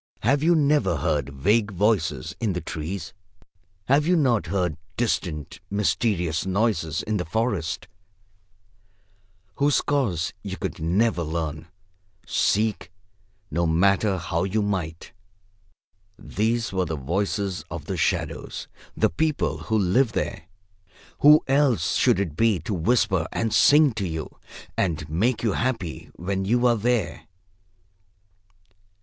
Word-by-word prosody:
Have 140 0 +2
you 170 +2 +4
never 145 - +2
heard 75 -2 -1
vague 100 +11 +1
voices 90 - 0
in 110 -4 0
the 90 - -2
trees? 80 +2 -5 0.7
Have 145 +6 +3
you 180 - +4
not 130 -9 +2
heard 90 -5 -1 0.2
distant, 85 -9 -2
mysterious 100 -5 0
noises 95 -5 0
in 110 -1 -1
the 90 - -1
forest, 90 -3 -2 1.7
whose 145 0 +3
cause 115 - 0
you 95 -2 -6
could 95 -5 -4
never 90 +5 +1
learn, 80 -1 -3 0.6
seek 105 -4 0 0.6
no 85 +3 +1
matter 95 +4 +2
how 85 -1 -2
you 100 +3 0
might? 90 -5 -3 1.1
These 110 0 -1
were 95 -1 +1
the 80 -1 -3
voices 95 +6 -2
of - - -6
the - - -3
shadows, - - -2 0.3
the - - +2
people 155 - 0
who 110 - -1
live 110 +5 +2
there. 85 -3 -3 0.7
Who 150 +1 +7
else 135 - +2
should - - +3
it 85 -7 -2
be 115 +1 +3
to 100 - -4
whisper 95 -2 +1
and 115 -2 -1
sing 150 -1 +6
to 100 -4 -3
you 80 -2 -5 0.4
and 80 -5 -1
make 110 +12 0
you 110 - +2
happy 115 -10 -3
when 95 +2 -2
you 120 +5 +2
are 120 -1 +5
there? 115 -2 -1
100 Hz, 130 wpm, -24 LUFS, 85-115 Hz, 1.7 s, Who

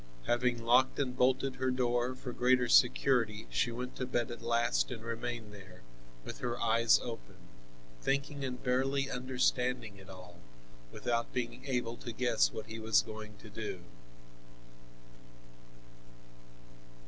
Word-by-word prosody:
Having 120 -1 +1
locked 125 +3 +4
and 130 -3 -1
bolted 130 +1 +2
her 130 0 0
door, 125 0 +1
for 125 -1 -7
greater 125 0 +3
security, 120 -3 +4
she 120 - +1
went 125 +2 -5
to 130 - -2
bed 120 -2 -1
at 120 - -7
last 115 - +1
and 110 - -6
remained 115 -1 -4
there, 95 -5 -13 0.4
with - - -7
her 120 -1 -3
eyes 115 0 +4
open, - - -7 0.7
thinking 140 - -1
and 125 -2 -4
barely 135 +2 +1
understanding 125 -3 0
it 95 -1 -14
all, 90 -2 -12 0.5
without 115 -1 -1
being 125 +1 -3
able 120 -3 -1
to 120 - -6
guess 115 - +2
what 110 - -6
he 110 0 -7
was 110 -2 +3
going 110 -1 -9
to 110 - -13
do. 105 -4 -5
120 Hz, 135 wpm, -33 LUFS, 110-125 Hz, 0.7 s, locked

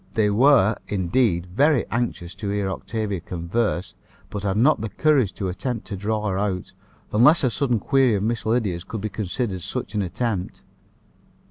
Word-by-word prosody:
They 105 -2 +3
were, 115 -2 +5
indeed, 95 -1 +1
very 135 - +2
anxious 110 -7 -2
to 100 +1 -5
hear 100 -1 -1
Octavia 105 -2 -3
converse, 90 +1 -2 0.4
but 105 - -4
had 100 -1 -1
not 130 +2 +4
the 110 - -3
courage 140 -9 +2
to 95 - -3
attempt 115 +6 -3
to 100 - -3
draw 105 +2 -2
her 95 -1 -1
out, 95 -3 -2 0.4
unless 130 +10 +5
a 130 - +2
sudden 125 -1 +1
query 130 +1 +3
of 100 - -1
Miss 115 +1 -1
Lydia's 110 -6 0
could 110 - -6
be 110 - -2
considered 100 0 -3
such 95 +2 -5
an 105 - 0
attempt. 100 0 -3
105 Hz, 170 wpm, -23 LUFS, 95-120 Hz, 0.4 s, were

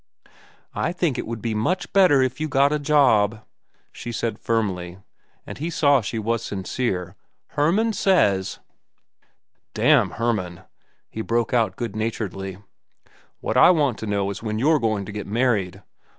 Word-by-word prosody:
"I 175 - -1
think 170 -7 -1
it - - -4
would 115 -1 -6
be 115 -2 -1
much 175 - -1
better 180 -9 +5
if 130 +1 -2
you 155 - 0
got 140 +1 +3
a 150 - 0
job," 115 -8 +3 0.5
she 120 - -7
said 115 -2 -3
firmly, 95 -6 -2 0.5
and - - -9
he 160 +4 -3
saw 145 -5 +3
she 115 +2 -4
was 115 +1 -1
sincere. 95 -2 -3 0.3
"Hermann 190 +10 +1
says—" 105 - +2 1.2
"Damn - - +4
Hermann!" 105 -7 -2 0.5
he 110 - -6
broke 115 +1 -1
out 110 -6 +1
good 115 -4 -5
naturedly. 100 -4 -4 0.8
"What - - -1
I - - +8
want 145 -9 +2
to 110 - -5
know 100 -1 -1
is 100 - -7
when 110 -1 -3
you're 150 +6 +3
going 110 -4 -1
to 105 - -8
get 105 -1 -6
married. 105 -5 0
115 Hz, 155 wpm, -23 LUFS, 105-140 Hz, 1.2 s, I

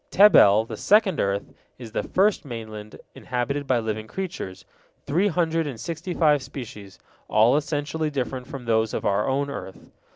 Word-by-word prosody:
Tebel, 110 - +6
the - - -7
second 210 -4 +3
earth, 100 0 -1 0.2
is 120 -3 -10
the - - -1
first 200 +1 +1
mainland 110 -5 -8
inhabited 135 +3 -3
by 130 - +3
living 110 -1 -3
creatures, 95 - -6 0.4
three 175 +8 +2
hundred 165 -3 0
and 130 -6 -6
sixty 170 +6 -5
five 150 -4 +3
species, 115 -7 -9 0.3
all 115 +5 +4
essentially 150 +1 -1
different 130 -2 -4
from 135 -3 -8
those 110 -1 +1
of - - -4
our 100 +1 +1
own 140 +1 -1
earth. 95 - -9
130 Hz, 160 wpm, -24 LUFS, 110-160 Hz, 0.4 s, Tebel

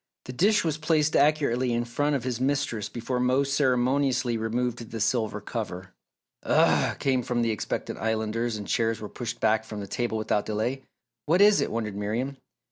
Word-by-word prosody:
The 125 - -7
dish 200 - +3
was 155 -2 -1
placed 155 -1 +2
accurately 140 -4 +2
in 120 0 0
front 145 +5 0
of 135 - -2
his 125 -1 -3
mistress 135 -5 -1
before 125 +2 -3
Mose 130 +2 +1
ceremoniously 130 -2 +2
removed 115 +1 -2
the 115 - -5
silver 110 -1 0
cover. 95 -4 -6 0.5
"Ugh!" - - +3
came 130 -2 +1
from 120 -1 -1
expectant 110 -3 -3
Islanders 110 +1 -1
and 105 - -7
chairs 115 -1 0
were 105 - -6
pushed 120 +2 -5
back 110 0 +2
from 110 -1 -7
the 100 - -5
table 120 +2 -2
without 105 -1 -1
delay. 110 +5 -1 0.5
"What 170 +4 +3
is 205 0 +6
it?" - - 0
wondered 110 -3 -3
Miriam. 115 +7 -2
120 Hz, 175 wpm, -26 LUFS, 110-135 Hz, 0.5 s, is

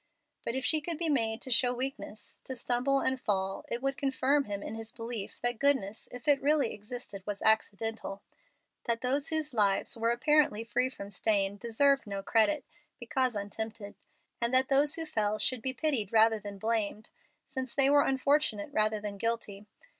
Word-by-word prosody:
But 230 - -2
if 265 - -2
she 310 -1 +4
could 330 +1 -4
be 330 0 -1
made 225 -5 0
to 260 - -5
show 245 +1 +3
weakness, 245 -4 -5
to 260 - -4
stumble 255 +3 +1
and 260 0 0
fall, 195 -1 -1
it 240 +2 -4
would 275 0 -1
confirm 275 +1 +1
him 200 -1 -5
in - - -5
his 225 0 -6
belief 230 -4 -5
that 245 -2 +1
goodness, 250 -7 +1
if 245 +4 -10
it 285 -2 +4
really 290 -3 +2
existed, 210 -1 -8
was 205 -1 -4
accidental; 220 -1 +1 0.6
that 230 -1 -1
those 275 +3 0
whose 310 -2 -1
lives 200 -4 +2
were 230 0 0
apparently 240 -2 +2
free 255 +2 0
from 200 -6 -9
stain 200 0 +1
deserved 235 +4 +2
no 200 -1 -4
credit, 230 +9 +2 0.3
because 260 -5 -1
untempted; 205 +1 -5 0.5
and 235 0 +1
that 260 0 +4
those 285 +3 +3
who 325 - -4
fell 215 -8 0
should 255 +1 0
be 260 - 0
pitied 260 -8 -1
rather 220 0 +4
than 205 -1 -8
blamed, 220 0 -2 0.3
since 260 -3 -5
they 275 -1 +4
were 285 +1 +6
unfortunate 270 -6 +1
rather 215 0 +1
than 205 -1 -6
guilty. 215 -3 -2
235 Hz, 180 wpm, -30 LUFS, 215-270 Hz, 0.6 s, were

